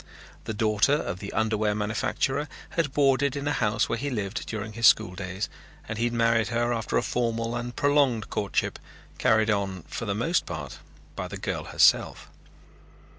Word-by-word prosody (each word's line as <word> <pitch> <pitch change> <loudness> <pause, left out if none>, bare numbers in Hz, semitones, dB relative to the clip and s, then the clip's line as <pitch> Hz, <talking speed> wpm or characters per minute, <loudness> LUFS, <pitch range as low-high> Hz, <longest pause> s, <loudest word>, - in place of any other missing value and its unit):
The 110 - -3
daughter 110 +4 +3
of 90 -10 -3
the 100 - -6
underwear 110 -1 +1
manufacturer 130 +7 -1 0.2
had 165 -5 0
boarded 140 -1 +2
in 140 0 -3
a 145 - +1
house 105 -4 +1
where 115 - -2
he 145 +3 -2
lived 105 -5 -3
during 110 -1 -5
his 115 0 +4
school 90 - +4
days 95 +2 -4 0.4
and 110 0 -4
he 120 - +2
had 120 - -1
married 115 -1 +2
her 120 +1 0
after 115 -2 -1
a - - +1
formal 115 -1 -1
and 120 0 -4
prolonged 140 -6 +2
courtship, 100 - -1 0.4
carried 110 0 +3
on 95 -4 -2
for - - -6
the - - -1
most - - 0
part - - -6 0.4
by - - -4
the - - -7
girl - - -3
herself. - - +3
115 Hz, 175 wpm, -26 LUFS, 105-125 Hz, 0.4 s, his